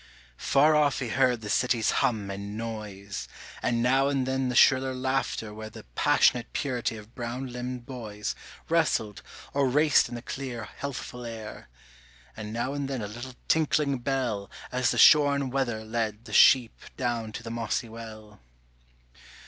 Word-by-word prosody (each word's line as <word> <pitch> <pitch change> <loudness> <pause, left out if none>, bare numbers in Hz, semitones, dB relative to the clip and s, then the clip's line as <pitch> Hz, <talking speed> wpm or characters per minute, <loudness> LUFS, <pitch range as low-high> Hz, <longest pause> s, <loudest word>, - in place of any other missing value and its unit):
Far 150 +3 +4
off 145 -3 +3
he 125 - -3
heard 125 -1 +2
the 105 - -7
city's 120 -3 +2
hum 105 -5 0
and 100 +1 -6
noise, 105 -4 -6 0.3
And 120 -1 +1
now 135 +2 +3
and 135 -2 0
then 130 0 0
the 125 - -2
shriller 130 +1 +5
laughter 130 -4 -2
where 110 0 -7
The - - -11
passionate 120 - +3
purity 125 -5 -2
of 110 +2 -13
brown 125 +1 -5
limbed 125 0 -5
boys 110 -6 -5 0.3
Wrestled 155 - +1 0.3
or 140 -2 +2
raced 150 +2 +4
in 120 - -6
the 120 - -7
clear 125 -5 -5
healthful 125 -3 -6
air, 115 -2 -8 0.7
And 105 -1 -7
now 120 +4 -2
and 140 -1 -3
then 130 -5 -3
a - - -3
little 120 +4 -8
tinkling 150 -3 +2
bell 120 -6 -2 0.2
As 125 0 +1
the - - -1
shorn 140 -3 +6
wether 120 -5 -1
led 110 0 -3
the 110 - -9
sheep 125 -1 +5 0.2
down 120 -3 -2
to - - -6
the 115 - -6
mossy 115 0 -2
well. 110 -2 -11
120 Hz, 160 wpm, -27 LUFS, 110-135 Hz, 0.7 s, shorn